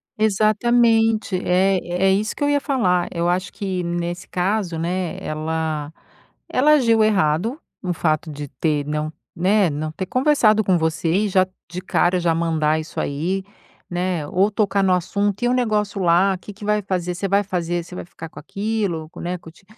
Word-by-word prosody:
Exatamente. 220 0 +2
É 185 +1 +3 0.3
é - - +5
isso 210 +3 0
que - - -3
eu 290 - +2
ia 290 0 +3
falar, 185 - +1
eu 170 0 -1
acho 185 +2 -1
que 190 -3 -3
nesse 175 +1 -3
caso, 185 -1 -1
né, 175 +2 -2
ela 155 -1 -3 0.6
ela 300 +4 +4
agiu 230 -6 +4
errado 205 - +1 0.2
no 180 -1 -1
fato 155 -1 -1
de 145 0 -6
ter 145 +2 -1
não 150 +1 -2 0.2
né, 190 +2 +3
não 155 +1 -3
ter 185 +4 -4
conversado 255 -4 +3
com 185 -3 +3
você, 160 0 0
e 205 +4 +2
já 185 -1 +4 0.2
de 180 +1 -5
cara 180 0 +1
já 170 -1 +2
mandar 160 -2 +1
isso 155 - -6
aí, 175 +7 -2 0.5
né, 175 -3 -1
ou 190 +6 +2
tocar 200 -2 +1
no 190 - +3
assunto: 200 +4 -1
"E - - +3
o - - +2
negócio 210 -5 0
lá? 180 +2 +4
Que 190 - -10
que 205 +1 -10
vai 210 0 +1
fazer? 180 -2 -2
Você 195 +3 -2
vai 200 +1 +2
fazer? 175 -2 -2
Você 175 - -13
vai - - -5
ficar 165 -1 -10
com - - -11
aquilo? 200 -3 -2
Com - - -12
né, 180 +1 -3
com 165 -2 -13
te". 170 - -23
185 Hz, 190 wpm, -21 LUFS, 165-210 Hz, 0.6 s, é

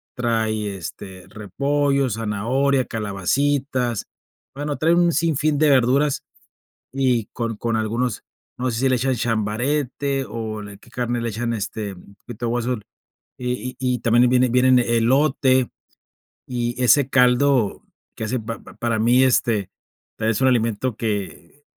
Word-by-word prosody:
trae, 110 -4 -1
este, 95 +2 -9
repollo, 140 +6 0
zanahoria, 120 +5 0
calabacitas, 120 +4 -1 0.5
bueno 145 0 -3
trae 165 +2 +3
un 175 0 +4
sinfín 155 -2 +1
de 155 -1 +4
verduras 135 +2 +3 0.7
y 125 -5 +1
con 115 -2 -3
con 115 0 -1
algunos, 115 0 -2 0.3
no 125 +1 -1
sé 115 - -3
si 135 0 +2
le 130 - +3
echan 130 +1 0
chambarete 125 +5 -1
o 110 -2 -5
de 105 -1 -10
qué - - -19
carne 120 -1 -2
le 115 - -2
echan, 115 +2 -2
este 105 -2 -4
mm, - - -14
un 100 - -17
poquito 120 +2 -8
de 115 - -1
hueso 120 +1 0 0.6
y 125 0 -4
y 125 -1 +1
y - - -5
también 120 +2 +4
eh, - - +4
viene 125 0 +3
vienen 125 +1 +4
elote 130 +2 +2 0.8
y 120 0 -3
ese 135 +2 +4
caldo 125 -2 +3 0.3
que - - -5
hace 125 +3 -1
pa 115 0 -5
pa - - -14
para 115 -2 -1
mí, 120 +3 +4
este, 115 -6 +2 0.5
es 110 +2 0
un 130 - +4
alimento 115 0 0
que 105 +2 -4
120 Hz, 150 wpm, -22 LUFS, 110-130 Hz, 0.8 s, un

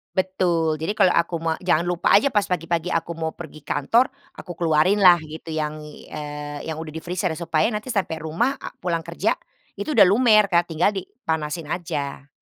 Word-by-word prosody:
Betul, 175 -4 +1
jadi 165 +7 -2
kalau 185 - +4
aku 170 +1 +1
me 165 0 -2
jangan 175 -3 +2
lupa 175 -1 0
aja 245 +7 +4
pas 205 -1 +2
pagi-pagi 170 -1 -1
aku 165 0 -1
mau 160 -1 -2
pergi 160 -2 -10
kantor, 225 - +2 0.3
aku 175 - -8
keluarin 170 +4 +3
lah, 175 -2 +8
gitu, 155 +1 -9
yang 155 0 -3
i 150 - -12
eee, 145 -1 -6
yang 155 - -5
udah 155 -1 -7
di 160 - -6
freezer, 180 0 -2
supaya 165 -1 +1
nanti 215 +3 -4
sampai 185 -5 -1
rumah 205 - 0
a - - -8
pulang 170 -2 -2
kerja, - - 0 0.4
itu 310 - -3
udah - - +7
lumer, 215 0 +5
Kak, 175 -2 +3
tinggal 165 +5 +3
dipanasin 160 - -4
aja. 145 -5 -4
170 Hz, 190 wpm, -23 LUFS, 155-185 Hz, 0.4 s, lah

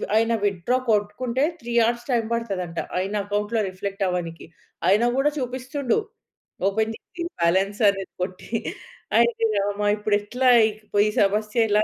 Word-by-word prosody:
ఆయన 225 +1 +3
విత్‌డ్రా 200 +6 +1
కొట్టుకుంటే 225 +5 +1 0.2
3 240 0 -6
horse 235 +2 -1
time 230 -2 +1
పడతదంట 190 -7 -3 0.2
ఆయన 195 +3 -2
అకౌంట్‌లో 210 +2 0
రిఫ్లెక్ట్ 195 +1 -4
అవ్వనీకి. 170 -2 -4 0.4
ఆయన 210 +4 +4
గూడా 295 +2 +3
చూపిస్తుండు 255 - -1 0.7
ఓపెన్ 220 +2 +1
చేసి 345 - -8 0.2
బాలన్స్ 190 +5 +1
అనేది 195 -1 -4
కొట్టి 185 +4 -7 0.7
అయ్యో! 235 -1 +3
రామా 205 +1 0
ఇప్పుడు 210 0 +1
ఎట్లా 250 +5 -1 0.6
‌ఈ - - +2
సమస్య 215 +3 +2
ఎలా? 210 +1 +4
210 Hz, 130 wpm, -24 LUFS, 195-235 Hz, 0.7 s, ఆయన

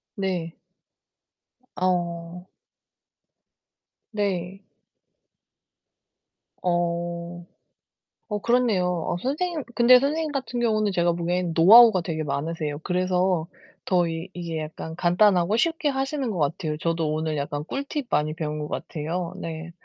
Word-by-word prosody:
네. 180 -4 -3 1.2
어. 175 -1 -2 1.6
네. 195 -3 -2 2.0
어 175 0 -2 0.8
어, 210 -1 -2
그렇네요. 235 -5 +2 0.2
어 - - -1
선생님 310 +3 -2
근데 250 +1 +7
선생님 305 +3 -1
같은 260 -3 -3
경우는 215 -3 +1
제가 175 -2 +2
보기엔 175 0 -1
노하우가 215 +3 +8
되게 160 -2 -3
많으세요. 150 +1 -3
그래서 180 -2 +1 0.4
더 180 -2 +2
이 165 +2 -5
이게 170 -2 -4
약간 160 +1 -6
간단하고 180 +3 +3
쉽게 325 +2 +1
하시는 270 -2 -2
것 180 - -4
같아요. 150 +1 -1
저도 165 -1 -1
오늘 155 0 -2
약간 145 +1 -3
꿀팁 280 - -4
많이 155 +1 +1
배운 150 -2 -4
것 150 - -5
같아요. 165 +2 -4
네. 165 +1 -6
175 Hz, 235 characters per minute, -25 LUFS, 165-215 Hz, 2.0 s, 노하우가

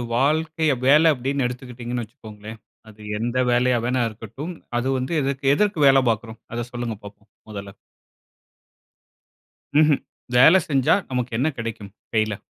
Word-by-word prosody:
வாழ்க்கைய 155 +4 +1 0.2
வேல 155 +4 +6
அப்படீன்னு 135 +1 -1
எடுத்துக்கிட்டீங்கன்னு 125 -1 -6
வச்சிக்கோங்களேன், 110 -2 -12 0.3
அது 105 0 -16 0.2
எந்த 120 +2 -2
வேலையா 125 0 +3
வேணா 125 0 +1
இருக்கட்டும், 115 - -8 0.3
அது 125 - -2
வந்து 130 +6 -3
எதற்கு 135 0 -3
எதற்கு 205 -1 +1
வேல 135 0 +6
பார்க்கிறோம்? 110 +1 -6 0.2
அத 120 0 -3
சொல்லுங்க 120 -3 -4
பார்ப்போம். 100 0 -14 0.2
முதல்ல. 100 -1 -8 2.0
ம்ஹ்ம். 150 -1 +5 0.4
வேல 160 +9 +7
செஞ்சா 135 -3 +3 0.2
நமக்கு 125 -1 -2
என்ன 135 +6 +1
கிடைக்கும். 110 -3 -6 0.2
கையில? 110 -2 +1
125 Hz, 130 wpm, -22 LUFS, 110-140 Hz, 2.0 s, வேல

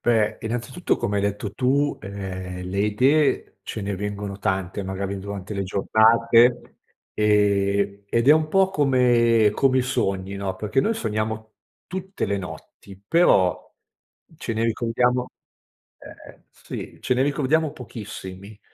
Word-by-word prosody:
Beh, 110 -2 +2
innanzitutto 120 +9 -2
come 100 0 -1
hai - - +1
detto 100 0 -2
tu, 140 +5 +1
ehm, 95 -2 -6
le 95 +2 -4
idee 130 +9 +2
ce 110 - -6
ne 100 0 -3
vengono 100 0 -5
tante 95 0 -2
magari 95 +1 -4
durante 100 +1 -6
le 100 - -2
giornate, 115 +5 +3 0.3
ehm, 100 -1 +1
ed 115 +4 +1
è - - +9
un 155 0 +2
po' 190 +3 +3
come 120 - +3
come 130 +1 +2
i 130 - +2
sogni, 100 -7 -1
no, 95 -1 -3
perché 110 +7 0
noi 225 +8 0
sogniamo 110 - -3 0.3
tutte 190 +1 -4
le 100 0 -1
notti, 95 +1 -11
però 100 - +3 0.7
ce 115 - -4
ne 110 +1 -1
ricordiamo 125 +2 0 0.7
ehm, - - -14
sì, - - -9
ce - - +1
ne 125 - +1
ricordiamo 145 +2 +1
pochissimi. 105 -6 -9
110 Hz, 140 wpm, -23 LUFS, 100-125 Hz, 0.7 s, è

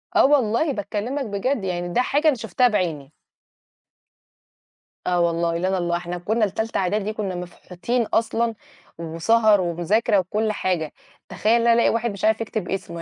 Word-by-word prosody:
آه - - +6
والله 275 +1 +2
باكلِّمك 215 +7 -3
بجد، 210 +3 -2
يعني 175 -1 -3
ده 250 - +3
حاجة 290 +5 +1
أنا 295 - +5
شُفتها 230 +3 +1
بعيني. 160 - -2 2.0
آه 180 -1 +2
والله، 170 0 +1
لنا 185 +2 0
الله، 175 -1 0
إحنا 175 0 -5
كُنّا 215 +5 0
لتالتة 220 +3 -3
إعدادي 205 +3 -1
كُنّا 195 -4 -3
مفحوتين 180 +6 -3
أصلًا 230 +1 0 0.4
وسَهَر 200 +6 +2
ومذاكرة 190 +5 +1
وكل 215 +4 -1
حاجة. 175 -7 -2 0.4
تخيَل 220 +2 +1
إن 235 - +1
أنا 230 - +6
ألاقي 235 - +3
واحد 230 -1 0
مش 200 +1 -4
عارف 220 +1 +2
يكتب 215 -4 -4
اسمه، 170 -3 -4
205 Hz, 155 wpm, -23 LUFS, 175-230 Hz, 2.0 s, آه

